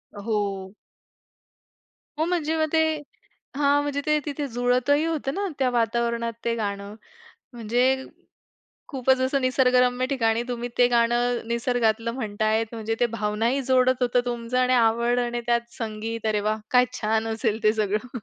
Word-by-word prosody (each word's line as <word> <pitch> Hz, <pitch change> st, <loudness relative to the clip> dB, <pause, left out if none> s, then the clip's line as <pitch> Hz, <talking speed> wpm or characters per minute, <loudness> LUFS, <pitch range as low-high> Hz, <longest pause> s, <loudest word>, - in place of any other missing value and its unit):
अ, -, -, -8 dB
हो. 200 Hz, -3 st, -2 dB, 1.4 s
हो, 315 Hz, -, +1 dB
म्हणजे 325 Hz, -2 st, -1 dB
मग 315 Hz, -, +2 dB
ते 320 Hz, -, +4 dB, 0.7 s
हां. 285 Hz, 0 st, +3 dB
म्हणजे 290 Hz, -1 st, -2 dB
ते 300 Hz, 0 st, +2 dB
तिथे 290 Hz, -1 st, -3 dB
जुळतही 250 Hz, +5 st, +1 dB
होतं 305 Hz, -4 st, -2 dB
ना 400 Hz, +2 st, -2 dB
त्या 260 Hz, -2 st, +2 dB
वातावरणात 235 Hz, 0 st, 0 dB
ते 230 Hz, 0 st, +1 dB
गाणं 200 Hz, -1 st, -4 dB, 0.6 s
म्हणजे 245 Hz, +3 st, +1 dB, 0.8 s
खूपच 265 Hz, -1 st, +1 dB
असं 260 Hz, +2 st, +1 dB
निसर्गरम्य 255 Hz, -1 st, +2 dB
ठिकाणी 230 Hz, -3 st, +1 dB
तुम्ही 240 Hz, -1 st, -3 dB
ते 245 Hz, -, +6 dB
गाणं 240 Hz, 0 st, +2 dB
निसर्गातलं 235 Hz, -1 st, 0 dB
म्हणताय, 220 Hz, -2 st, 0 dB
म्हणजे 225 Hz, -1 st, -3 dB
ते 240 Hz, -, +4 dB
भावना 215 Hz, 0 st, -1 dB
ही 275 Hz, +3 st, 0 dB
जोडत 255 Hz, 0 st, +2 dB
होतं 245 Hz, 0 st, +3 dB
तुमचं 240 Hz, +1 st, -2 dB
आणि 255 Hz, 0 st, +2 dB
आवड 235 Hz, +1 st, +2 dB
आणि 240 Hz, 0 st, -1 dB
त्यात 235 Hz, 0 st, 0 dB
संगीत 225 Hz, 0 st, -5 dB
अरे 215 Hz, -1 st, +1 dB
वाह! 215 Hz, 0 st, +1 dB
काय 250 Hz, 0 st, +5 dB
छान 220 Hz, -2 st, -1 dB
असेल 220 Hz, -1 st, -1 dB
ते 215 Hz, -1 st, +4 dB
सगळं 215 Hz, +3 st, -2 dB
240 Hz, 150 wpm, -24 LUFS, 225-255 Hz, 1.4 s, ते